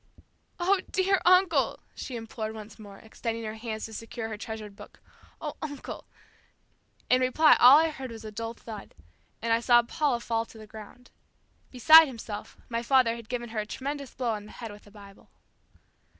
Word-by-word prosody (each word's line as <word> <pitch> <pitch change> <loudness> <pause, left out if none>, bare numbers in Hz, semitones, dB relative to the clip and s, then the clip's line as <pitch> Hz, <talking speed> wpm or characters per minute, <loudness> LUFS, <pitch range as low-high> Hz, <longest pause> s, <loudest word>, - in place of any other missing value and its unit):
"Oh, 370 +2 +2
dear 385 0 +1
uncle," 365 -1 +4
she 255 - -7
implored 225 -1 -5
once 215 0 -11
more, 200 -2 -11
extending 230 +1 -5
her 215 -1 -4
hands 220 -1 -5
to 225 - -10
secure 225 0 -6
her 220 - -4
treasured 215 -2 -7
book, - - -14 0.4
"oh, - - -6
uncle." 290 -3 -7 1.0
In 255 0 +3
reply 280 +5 +5
all 255 +4 +9
I 325 +1 +3
heard 265 -3 -7
was 225 -1 -10
a 215 - -7
dull 230 +2 -5
thud, 215 -4 -10 0.5
and 230 0 +2
I 230 - +3
saw 240 0 +5
Paula 275 0 0
fall 230 -1 -1
to - - -15
the 215 - -11
ground. 220 +3 -13 0.6
Beside 315 +5 +8
himself, 220 -5 -8
my 230 -1 -2
father 245 -1 +3
had 230 -2 -11
given 240 -2 -4
her 220 -1 -4
a 210 - -2
tremendous 280 +3 -5
blow 245 -2 -1
on 210 -1 -5
the - - -13
head 230 -3 -8
with 205 0 -14
the - - -16
Bible. 200 -1 -15
230 Hz, 185 wpm, -28 LUFS, 220-260 Hz, 1.0 s, all